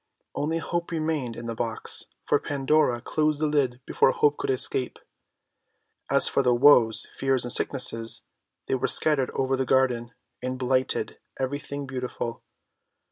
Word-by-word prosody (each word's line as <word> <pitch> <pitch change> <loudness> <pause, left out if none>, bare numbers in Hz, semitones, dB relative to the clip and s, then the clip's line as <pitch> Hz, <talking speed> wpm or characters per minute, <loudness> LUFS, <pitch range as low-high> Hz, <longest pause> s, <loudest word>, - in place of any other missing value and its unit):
Only 160 +3 -2
Hope 170 +1 -3
remained 155 -7 -2
in 120 - -8
the 115 - -4
box, 115 0 -2 0.2
for - - +2
Pandora 140 -3 0
closed 155 +2 -1
the 155 - 0
lid 135 -4 0
before - - +2
Hope 145 +2 +1
could - - -4
escape. 130 -1 -1 1.1
As - - +6
for - - +1
the 125 -2 +2
Woes, 120 -4 +5
Fears, 135 -2 +2
and 120 - +1
Sicknesses, 115 -4 +1 0.4
they - - -1
were 130 - 0
scattered 145 -5 +3
over 135 0 0
the 130 - -1
garden, 125 -3 +1 0.3
and 130 +1 -4
blighted 130 0 -1 0.2
every 135 +2 -2
thing 140 0 -7
beautiful. 125 -3 -5
130 Hz, 150 wpm, -25 LUFS, 125-145 Hz, 1.1 s, As